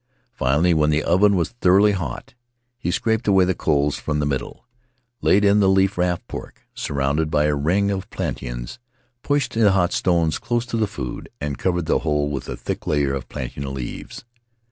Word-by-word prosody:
Finally, 75 +7 +2
when 75 -1 +2
the 75 0 +1
oven 100 +4 +4
was 85 -3 0
thoroughly 105 -3 +4
hot, 85 -11 -5 0.5
he 125 - -2
scraped 110 +5 0
away 95 -2 +5
the 95 - +1
coals 75 -3 +1
from 75 - -2
the 75 - 0
middle, 70 -2 -4 0.6
laid 105 +1 +4
in 100 +1 +5
the 95 -2 +4
leaf 95 0 +3
wrapped 90 -1 -1
pork, - - -9
surrounded 70 +3 -1
by 75 -1 +2
a 75 0 +2
ring 90 +8 +1
of 95 -2 -4
plantains, - - -5 0.4
pushed 145 -1 0
the 110 -3 +4
hot 90 -2 +2
stones 85 -3 +1
close 120 0 -1
to 125 - -5
the 110 -2 +1
food, 80 - -6
and 70 -3 -4
covered 90 -2 0
the - - +2
whole 75 -2 0
with 70 -3 -5
a - - -4
thick - - -5
layer 70 -2 +1
of 70 -2 -5
plantain 65 +2 -5
leaves. 65 - -7
85 Hz, 190 wpm, -22 LUFS, 75-100 Hz, 0.6 s, away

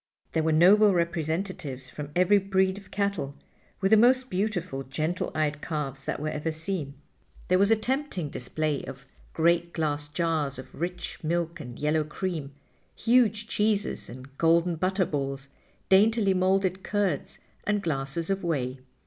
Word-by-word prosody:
There 160 - +1
were 160 0 +1
noble 195 +5 +6
representatives 165 -5 -2
from 145 -1 -6
every 185 +3 +5
breed 190 0 +1
of 195 -2 -17
cattle, 200 -9 -2 0.5
with 195 +1 +2
the 220 - +8
most 255 +3 +4
beautiful, 185 -7 -1
gentle 155 +6 -2
eyed 150 -1 0
calves 140 -4 -4
that - - -2
were 155 +1 -2
ever 155 +2 -2
seen. 160 -3 -3 0.5
There 185 0 +4
was 200 +1 +4
a 225 - +6
tempting 240 - -2
display 150 +3 -2
of 135 +1 -9 0.3
great 170 +1 +2
glass 145 -2 -1
jars 155 -3 -1
of 130 +3 -10
rich 180 0 -4
milk 170 +1 -1
and 125 -5 -8
yellow 150 +1 +1
cream, 155 -2 -4 0.4
huge 225 -3 +3
cheeses 210 -1 0
and 130 +3 -11
golden 170 +1 +3
butter 185 +2 +1
balls, 140 -2 -3 0.4
daintily 205 +1 +4
molded 190 0 +1
curds 200 -8 -1 0.3
and 205 -1 +1
glasses 150 +2 -2
of 195 -1 -1
whey. 135 -6 -1
170 Hz, 150 wpm, -27 LUFS, 150-195 Hz, 0.5 s, the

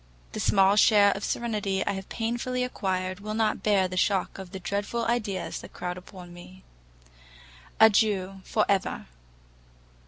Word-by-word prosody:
The - - -5
small 195 0 +4
share 205 -1 +6
of 200 - -4
serenity 205 -5 -1
I - - 0
have 195 -1 -6
painfully 240 +2 -2
acquired, 185 -6 -2
will 215 +1 -5
not 220 -1 0
bear 200 -3 +2
the 185 0 -6
shock 195 0 0
of 190 -2 -8
the 190 +1 -7
dreadful 200 +5 -2
ideas 215 -6 -2
that - - -13
crowd 180 0 -4
upon 180 -1 -12
me. 180 +2 -14 1.2
Adieu, 200 -3 +3
for 215 - +1
ever! 195 -1 -1
195 Hz, 150 wpm, -27 LUFS, 185-215 Hz, 1.2 s, share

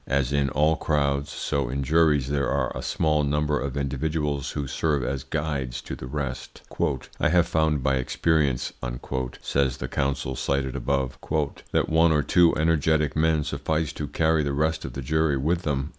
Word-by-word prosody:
As 70 0 0
in 70 -1 +2
all 75 +4 +2
crowds, 70 -2 0
so 70 -3 -2
in 70 +2 -2
juries 75 -3 +3
there 70 -1 0
are 70 -3 -1
a - - -4
small 75 -1 +1
number 75 +1 +1
of 70 0 -4
individuals 70 +1 -1
who 70 -2 -2
serve 70 0 0
as 65 +2 -2
guides 70 -6 -3
to - - -6
the 65 - -8
rest. 65 -2 -5 0.6
"I - - +3
have 85 +1 +3
found 80 -3 +1
by 70 -1 +2
experience," 70 0 0 0.7
says 65 -2 +1
the - - -4
counsel 70 -1 -1
cited 65 0 -1
above, 70 -3 -1 0.5
"that - - +2
one 80 +1 +4
or 75 -2 +2
two 85 0 +4
energetic 80 -2 +2
men 80 -1 +2
suffice 80 +1 -2
to 75 - -4
carry 80 0 +2
the 70 -1 -1
rest 80 +3 0
of - - -6
the 70 - -5
jury 80 +1 +1
with 80 +6 0
them." 70 -3 -1
70 Hz, 175 wpm, -25 LUFS, 70-80 Hz, 0.7 s, one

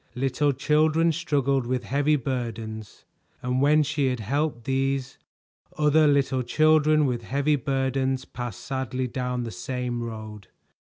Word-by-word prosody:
Little 135 +3 +1
children 155 +4 +2
struggled 140 -5 0
with 125 0 -1
heavy 145 +2 +1
burdens, 115 -5 -5 0.4
and 125 +1 0
when 150 +2 +4
she 145 -1 0
had 125 -1 -1
helped 135 +3 -1
these, 135 +1 -1 0.6
other 150 +1 +4
little 135 -2 +2
children 155 +3 +3
with 125 -3 -1
heavy 140 +5 +1
burdens 135 -1 -1
passed 120 -5 -6
sadly 130 -1 -3
down 125 0 -3
the 115 - -5
same 120 0 -4
road. 110 -3 -7
135 Hz, 130 wpm, -25 LUFS, 125-145 Hz, 0.6 s, when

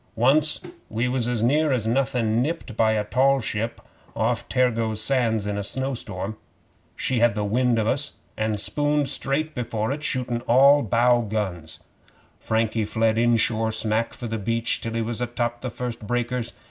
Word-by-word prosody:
Once 145 +6 +3 0.3
we 115 +3 -1
was 125 -2 0
as 120 -2 0
near 150 +5 +3
as 125 -5 0
nothin' 120 -2 +1
nipped 145 -5 -3
by 110 -1 +3
a 105 -1 0
tall 135 +5 +3
ship 115 0 -3 0.4
off 110 0 -1
Tergoes 115 -4 +1
Sands 115 -3 +1
in 105 0 -2
a - - -1
snowstorm. 110 -4 -3 0.6
She 130 -2 0
had 115 -2 +3
the 105 - -1
wind 120 +3 +1
of 110 - +1
us, 140 +6 0 0.2
and 110 -1 -1
spooned 145 +5 +1
straight 145 +3 -1
before 115 -2 -2
it, 145 +2 -3
shootin' 125 -4 -1
all 140 +4 +6
bow 120 +2 +3
guns. 100 -7 -4 0.6
Frankie 110 0 0
fled 110 +1 +1
inshore 115 -1 +2
smack 110 +1 -1
for 120 - -7
the 115 -1 -3
beach, 115 +3 -1
till 115 - -4
he 115 0 -1
was 115 +1 -4
atop 120 -1 -2
of - - -30
the 130 - -3
first 120 -2 -6
breakers. 120 0 -2
115 Hz, 170 wpm, -24 LUFS, 110-130 Hz, 0.6 s, all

